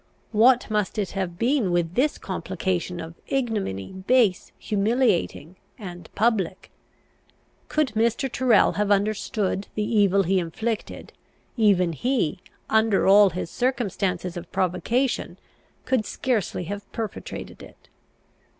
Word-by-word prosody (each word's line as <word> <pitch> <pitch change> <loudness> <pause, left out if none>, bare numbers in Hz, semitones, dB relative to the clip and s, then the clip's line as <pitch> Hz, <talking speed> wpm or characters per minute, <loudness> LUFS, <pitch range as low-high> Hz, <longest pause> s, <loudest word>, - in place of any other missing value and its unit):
What 240 +3 +4
must 210 0 -1
it 205 -3 -1
have 185 -3 -3
been 235 -4 +1
with 175 -1 0
this 275 +8 +1
complication 180 -1 -3
of 165 0 -7
ignominy, 215 - -2
base, 190 +1 +1
humiliating, 205 - 0 0.2
and 175 -6 -9
public? 200 -5 0 1.0
Could 305 -3 +1
Mr. 230 +4 +1
Tyrrel 245 -3 +3
have 205 0 +1
understood 205 -1 0
the 210 - 0
evil 200 -3 +3
he 190 +2 +2
inflicted, 220 +6 -4 0.4
even 195 -7 +3
he, 210 - 0 0.3
under 220 -2 +3
all 200 +1 +7
his 170 -1 -5
circumstances 200 -8 -1
of 175 0 -8
provocation, 195 +8 0 0.5
could 255 -4 +1
scarcely 225 -8 -1
have 205 +4 -7
perpetrated 225 -2 -6
it. - - -15
205 Hz, 115 wpm, -24 LUFS, 185-235 Hz, 1.0 s, all